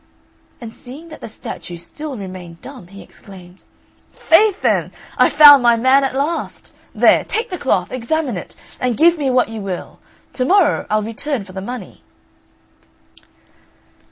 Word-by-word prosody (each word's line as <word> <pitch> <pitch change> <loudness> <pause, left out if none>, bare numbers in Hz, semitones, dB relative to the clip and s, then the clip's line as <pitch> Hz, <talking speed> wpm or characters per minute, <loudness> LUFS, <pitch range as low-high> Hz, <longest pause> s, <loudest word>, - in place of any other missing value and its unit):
And 230 -2 -9
seeing 280 +9 -11
that 310 - -12
the - - -7
statue 180 -5 -8
still 275 - -7
remained 185 -4 -9
dumb, 255 -10 -11
he 195 +2 -13
exclaimed, 185 -2 -15 0.5
"Faith, 410 +4 +2
then, - - +1 0.2
I've - - +3
found 290 -2 +9
my 235 -1 +4
man 260 +4 +3
at 265 -1 -2
last! 295 +5 -4 0.2
There, - - +4
take 450 0 -3
the 365 - -5
cloth, 185 -9 0
examine 255 +1 -2
it, 180 - -8 0.2
and 250 -2 -1
give 335 +1 +4
me 280 -2 0
what 250 -3 +2
you 225 -1 -7
will; 190 -3 -6 0.3
to 255 - -1
morrow 355 +1 +2
I'll 215 0 0
return 230 +3 -4
for 190 -1 -14
the 190 - -6
money." 245 +5 -8
250 Hz, 155 wpm, -18 LUFS, 200-295 Hz, 0.5 s, found